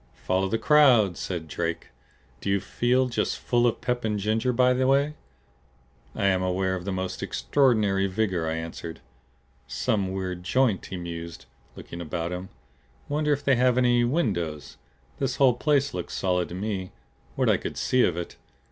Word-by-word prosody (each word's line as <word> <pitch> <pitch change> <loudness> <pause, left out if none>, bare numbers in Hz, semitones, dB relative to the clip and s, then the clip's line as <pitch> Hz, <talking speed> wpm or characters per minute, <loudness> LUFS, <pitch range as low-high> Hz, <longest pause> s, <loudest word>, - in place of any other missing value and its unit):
"Follow 95 +1 +1
the 115 - +1
crowd!" 125 - +5
said 85 -3 -4
Drake. 85 +1 -3 0.5
"Do - - -4
you 100 0 +2
feel 125 +6 +1
just 120 - -1
full 120 0 +2
of 115 - -1
pep 125 -1 -1
and 105 -1 0
ginger, 110 +4 0
by 125 +1 +3
the 130 +1 +1
way?" 140 +2 +3 1.0
"I - - -1
am 95 -1 +3
aware 95 +1 0
of 90 -1 -4
the 100 - -2
most 95 0 -3
extraordinary 105 -8 +2
vigor," 95 -4 -1
I 80 - -1
answered. 80 0 -6 0.7
"Some 95 - -1
weird 95 -2 -4
joint," 115 +1 +1
he 95 - -6
mused, 85 -3 -7 0.3
looking 85 - -8
about 85 +1 -3
him. 90 +1 -5 0.6
"Wonder 150 +1 0
if 145 0 0
they 135 -3 +3
have 125 0 +3
any 120 -1 +4
windows? 95 - -1 0.4
This 135 -2 -1
whole 135 -3 +5
place 140 +2 +1
looked 90 -1 -5
solid 90 -2 0
to 85 - -6
me 95 -1 -3 0.4
what - - +1
I - - +4
could - - -6
see 130 - +2
of 85 - +1
it. 85 - -6
100 Hz, 175 wpm, -26 LUFS, 90-125 Hz, 1.0 s, crowd